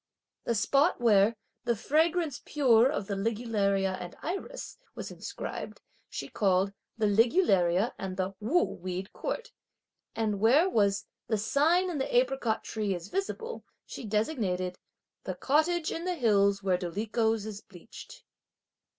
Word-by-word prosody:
The 235 - 0
spot 275 - +2
where 220 -2 +4 0.3
"the 235 - +2
fragrance 315 - +1
pure 255 -4 +4
of 210 - -2
the 200 - -3
ligularia 200 -3 0
and 175 -1 -7
iris," 390 +9 -5 0.2
was - - -6
inscribed, - - -6 0.3
she - - -5
called 195 -1 +1 0.2
"the 220 - +1
ligularia 205 - +3
and 190 -1 -5
the 190 +1 -1
'Wu' 285 +12 +2
weed 185 +1 -5
court;" - - -4 0.6
and 215 -3 -1
where 260 - +5
was 205 - +1 0.2
"the 220 - +1
sign 320 - +2
in 305 - -3
the 265 -2 0
apricot 250 -3 +1
tree 210 -3 -2
is 175 +2 -8
visible," 450 +4 -4 0.2
she - - -8
designated 210 - -1 0.5
"the - - -4
cottage 315 +4 +1
in 330 - -4
the 365 -1 0
hills 200 - +3
where 185 -2 +2
dolichos 215 +4 -1
is 210 -1 -6
bleached." 175 -4 -13
220 Hz, 140 wpm, -29 LUFS, 195-285 Hz, 0.6 s, where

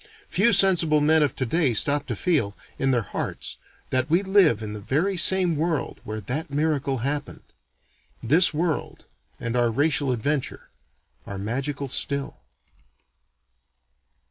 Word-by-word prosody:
Few 220 +5 +3
sensible 170 -7 +4
men 155 +2 +3
of 145 -4 0
today 130 0 0
stop 145 +6 +1
to - - -3
feel, 125 - 0 0.2
in 135 - +1
their 120 -3 +1
hearts, - - -5 0.3
that 130 +2 +1
we 170 +5 +2
live 190 - +3
in 105 -1 -5
the 105 - -7
very 160 - 0
same 180 -1 +4
world 160 0 -2
where 110 +1 -5
that 140 - -4
miracle 145 -2 -1
happened. 145 +1 -4 0.8
This 160 +10 +5
world, 160 0 -3 0.3
and 115 +1 -3
our 120 -1 +2
racial 140 +2 0
adventure, 135 +4 -3 0.6
are 100 - -6
magical 135 +7 -3
still. 140 +2 -3
145 Hz, 135 wpm, -24 LUFS, 125-160 Hz, 0.8 s, This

